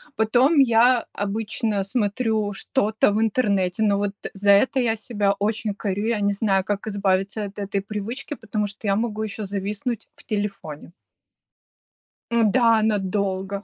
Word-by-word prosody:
Потом 250 +7 +3
я 240 -1 +4
обычно 210 0 -2
смотрю 215 0 -1
что-то 220 -1 +1
в 210 - 0
интернете, 205 -4 +1
ну 205 -2 +3
вот 205 0 -1 0.2
за 200 +1 +3
это 255 +7 +4
я 230 -3 +1
себя 205 -2 -1
очень 215 0 -1
корю. 205 +1 -2
Я 230 -3 0
не 200 0 +2
знаю, 195 -2 +1
как 205 +1 -3
избавиться 195 0 0
от 200 +1 -9
этой 200 0 -2
привычки, 220 +8 -5
потому 215 -2 -3
что 205 +1 -8
я 195 - +3
могу 220 -1 -2
ещё 215 0 -5
зависнуть 205 +4 -4
в 290 - -14
телефоне. 195 -8 -5 1.4
М-да, 230 0 +4
надолго! 200 -1 -1
210 Hz, 145 wpm, -23 LUFS, 200-225 Hz, 1.4 s, я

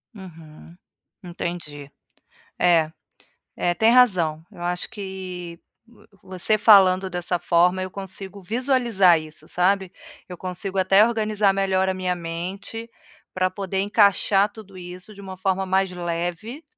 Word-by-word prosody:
Uhum. 165 -4 -13 0.5
Entendi. 170 -5 -6 0.7
É 165 -3 +3 0.7
é 175 - 0
tem 220 +6 +3
razão, 175 -11 +3
eu - - -15
acho 175 0 -3
que, 185 -3 -7 0.3
vo 235 0 -22 0.2
você 190 +4 0
falando 190 -3 +6
dessa 180 0 -2
forma 175 +2 +2
eu 185 - -4
consigo 195 +1 -8
visualizar 230 -5 +3
isso, 155 0 -12
sabe. 190 +2 0 0.4
Eu 180 - -8
consigo 185 +2 -5
até 195 +3 +5
organizar 215 -3 +1
melhor 190 -1 +1
a 190 - 0
minha 185 -1 -2
mente, 180 +7 -6 0.4
para 185 0 +1
poder 195 -1 -4
encaixar 200 -1 +3
tudo 200 -3 -13
isso 180 +3 -9
de 200 - -13
uma 190 -1 -8
forma 190 0 -1
mais 190 +1 +1
leve, 175 - -4
185 Hz, 130 wpm, -23 LUFS, 175-200 Hz, 0.7 s, falando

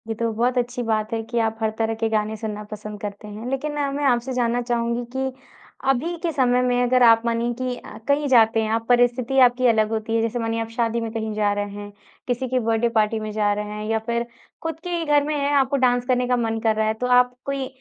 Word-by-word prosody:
ये 225 - -2
तो 230 -1 0
बहुत 245 +3 0
अच्छी 245 +1 -1
बात 215 -1 -1
है 225 - -1
कि 235 +1 -2
आप 220 0 -5
हर 220 - +2
तरह 225 0 +1
के 225 0 -1
गाने 215 0 0
सुनना 210 -1 -5
पसंद 210 0 -7
करते 205 0 -6
हैं। 210 +2 -8
लेकिन 270 +3 -2
ना 290 -1 -1
मैं 285 +1 -3
आपसे 250 0 +1
जानना 245 -1 +1
चाहूँगी 235 0 -1
कि 265 0 -1 0.6
अभी 290 +7 +1
के 340 - 0
समय 250 -4 +2
में 245 0 +1
अगर 250 0 +3
आप 230 -1 +7
मानिए 235 +1 0
कि 255 -1 -2
अ, - - -11
कहीं 285 +1 +2
जाते 225 -3 +4
हैं 215 - -2
आप 225 0 0
परिस्थिति 245 +1 +2
आपकी 250 0 +5
अलग 220 -2 +3
होती 225 0 -2
है। 225 - +2
जैसे 230 +1 -1
मानिए 225 0 -1
आप 225 - -5
शादी 235 0 0
में 225 -1 -4
कहीं 220 -1 -3
जा 210 -1 +1
रहे 205 0 -2
हैं, 205 0 -8 0.4
किसी 250 +1 -1
के 255 +1 0
बर्थडे 225 0 +1
पार्टी 220 0 +2
में 215 0 -5
जा 210 -1 +1
रहे 210 0 -3
हैं 210 0 -5
या 225 0 +1
फिर 235 0 -1 0.4
खुद 325 -1 -4
के 355 - -5
ही 335 -1 -2
घर 295 -1 +3
में 300 +1 -2
हैं 285 0 0
आपको 275 +1 +2
डांस 245 0 +2
करने 250 -1 +1
का 250 - +2
मन 225 -1 -1
कर 220 -1 +3
रहा 215 0 +1
है, 220 - +1
तो 250 +3 -3
आप 250 0 +4
कोई 275 -1 -2
235 Hz, 260 wpm, -23 LUFS, 220-255 Hz, 0.6 s, आप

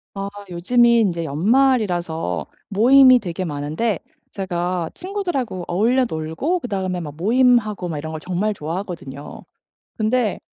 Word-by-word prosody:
아 195 0 -4 0.2
요즘이 235 +7 +3
인제 175 -6 0
연말이라서 175 - +1 0.2
모임이 255 +5 +7
되게 185 -2 -4
많은데 155 +7 -2 0.3
제가 175 -3 -2
친구들하고 350 - -3
어울려 235 +8 +2
놀고 160 - -2
그다음에 190 - -3
막 150 -4 -7
모임하고 215 0 +2
막 160 -3 -4
이런 160 +2 -5
걸 160 - -5
정말 185 +5 -1
좋아하거든요. 165 -5 -6 0.5
근데 220 -1 0
190 Hz, 310 characters per minute, -21 LUFS, 170-240 Hz, 0.5 s, 모임이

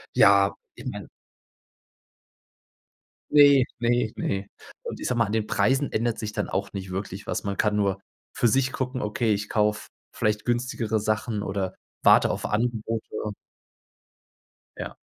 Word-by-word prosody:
Ja, 100 0 +6 0.2
ich - - -11
meine - - -6 2.2
Ne, 140 -3 +7
ne, 120 -1 +1
ne. 95 0 -2 0.4
Und - - -6
ich - - -3
sage 125 - 0
mal, 115 - +3
an 100 - -5
den 110 -1 0
Preisen 135 +5 +1
ändert 115 0 0
sich 105 -1 -4
dann - - -2
auch 100 +1 -2
nicht 95 -2 -6
wirklich 95 +1 -5
was. - - -2
Man 100 -1 -2
kann 105 -1 +1
nur 100 -2 +1 0.4
für 120 - +3
sich 130 +3 +2
gucken, 130 0 -3
okay, 110 +1 0
ich 105 0 -2
kaufe 105 0 0 0.2
vielleicht 105 0 0
günstigere 120 -2 0
Sachen 110 0 -1
oder 95 -2 -2 0.3
warte - - +6
auf - - -3
Angebote. 115 0 -1 1.7
Ja. - - -6
110 Hz, 145 wpm, -26 LUFS, 100-120 Hz, 2.2 s, Ne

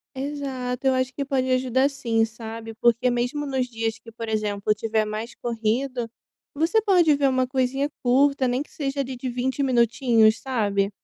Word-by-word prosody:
Exato. 265 -2 -3
Eu 265 - +4
acho 255 0 0
que 280 - -3
pode 260 -2 0
ajudar, 255 +1 +2
sim, 230 -5 0
sabe, 225 0 -8
porque 235 +2 +3
mesmo 245 +4 -1
nos 265 -3 -1
dias 225 -1 -3
que, 230 0 -13
por 230 0 -7
exemplo, 210 -1 0
tiver 220 0 0
mais 215 +2 -5
corrido, 235 +2 -2 0.5
você 330 +9 +2
pode 360 -7 +4
ver 280 -1 +2
uma 255 -1 +1
coisinha 265 +2 0 0.2
curta, 265 +2 +3
nem 250 +3 0
que - - -25
seja 280 -1 -2
ali 265 -1 -5
de 255 +1 -4
20 255 +3 -2
minutinhos, 235 -3 +3
sabe. 205 -6 0
250 Hz, 175 wpm, -24 LUFS, 225-270 Hz, 0.5 s, Eu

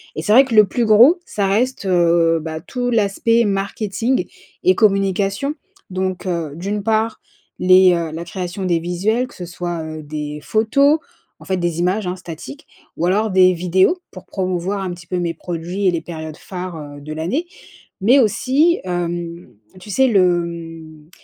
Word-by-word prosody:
et - - -3
c'est 210 +6 +1
vrai 260 +4 +8
que 255 - -5
le 215 -1 +8
plus 240 +3 0
gros, 240 - +6
ça 200 -2 -1
reste, 225 +3 0
heu, 170 -2 +3
bah, 160 0 -5
tout 245 +8 -3
l'aspect 230 +1 +2
marketing 205 +5 -1 0.4
et 370 +1 +4
communication, 195 +5 +1 0.4
donc 185 0 -3
heu, 170 -4 -2
d'une 200 +5 -3
part 220 +1 0 0.4
les, 185 0 +6
heu, 170 -2 -2
la 165 +2 -6
création 180 +2 -5
des 170 -2 +1
visuels, 195 +9 -1
que - - -17
ce 180 - -7
soit, 175 -1 -4
heu, 155 0 -7
des 150 0 -5
photos, 275 +8 +3 0.4
en - - -14
fait, 190 - -1
des 175 -2 -2
images, 185 +4 0
hein, 180 - -2
statiques, 160 -6 -10 0.3
ou 170 - 0
alors 210 +5 +1
des 185 -1 +5
vidéos 185 - +2
pour 185 - -11
promouvoir 185 +1 -2
un 185 -2 -3
petit 175 -1 -10
peu 180 - -2
mes 170 -1 -1
produits 175 +3 -3
et - - +4
les 170 -2 -2
périodes 160 -2 -7
phares, 185 -2 -7 0.2
heu, - - -12
de 155 +2 -7
l'année, 180 - -2 0.6
mais 245 +8 +5
aussi, 270 - +2
hem, 175 -1 -4 0.3
tu 205 - -11
sais, 265 +7 +3
le, 180 -7 +3
mmh, 165 -2 -9
185 Hz, 180 wpm, -19 LUFS, 170-215 Hz, 0.6 s, vrai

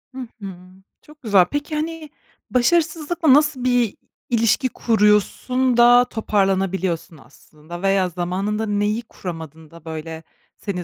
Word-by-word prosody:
Hı 255 -3 -6
hı. 195 -2 -7 0.5
Çok 300 0 -19
güzel. 200 -6 +4
Peki, 290 +1 -3
hani, 315 0 -4 0.4
başarısızlıkla 320 +3 +2
nasıl 295 -3 +2
bir 245 -4 +1 0.3
ilişki 235 +2 +2
kuruyorsun 230 +4 +1
da, 245 +1 +6
toparlanabiliyorsun 190 -6 -1
aslında 155 +7 -13
veya 195 -1 +2
zamanında 190 +5 -2
neyi 210 +2 -1
kuramadın 160 -7 -9
da, 165 -1 -15
böyle 160 0 -7 0.3
seni 180 -4 -5
210 Hz, 115 wpm, -21 LUFS, 180-255 Hz, 0.5 s, da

